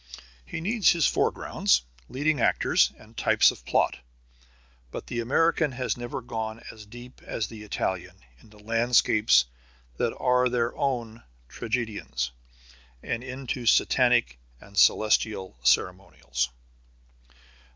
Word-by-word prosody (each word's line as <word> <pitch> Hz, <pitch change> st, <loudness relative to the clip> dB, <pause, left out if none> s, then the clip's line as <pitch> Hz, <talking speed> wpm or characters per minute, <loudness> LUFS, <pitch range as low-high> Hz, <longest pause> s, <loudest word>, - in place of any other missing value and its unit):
He 115 Hz, -, -6 dB
needs 210 Hz, +3 st, +3 dB
his 165 Hz, -4 st, +1 dB
foregrounds, 65 Hz, -2 st, +1 dB, 0.3 s
leading 145 Hz, +2 st, 0 dB
actors, -, -, +3 dB
and 110 Hz, +1 st, -18 dB
types -, -, +4 dB
of -, -, -14 dB
plot. -, -, +1 dB, 0.9 s
But -, -, -7 dB
the 120 Hz, -, -4 dB
American 150 Hz, +4 st, +1 dB
has 125 Hz, 0 st, -2 dB
never 120 Hz, +1 st, -6 dB
gone 110 Hz, -1 st, -5 dB
as 105 Hz, -2 st, -13 dB
deep 120 Hz, +3 st, -13 dB
as 110 Hz, -, -3 dB
the 110 Hz, +1 st, -10 dB
Italian 95 Hz, -3 st, -3 dB, 0.2 s
into 105 Hz, -1 st, -19 dB
landscapes 115 Hz, -, +3 dB, 0.5 s
that -, -, -1 dB
are 125 Hz, 0 st, +2 dB
their 120 Hz, -1 st, -1 dB
own 120 Hz, -4 st, -2 dB, 0.3 s
tragedians, 105 Hz, -, -3 dB, 0.7 s
and 120 Hz, 0 st, -3 dB
into 130 Hz, -1 st, -5 dB
Satanic -, -, +3 dB, 0.2 s
and 100 Hz, +7 st, -16 dB
celestial 105 Hz, -, +2 dB
ceremonials. 75 Hz, -4 st, 0 dB
115 Hz, 115 wpm, -26 LUFS, 100-125 Hz, 0.9 s, types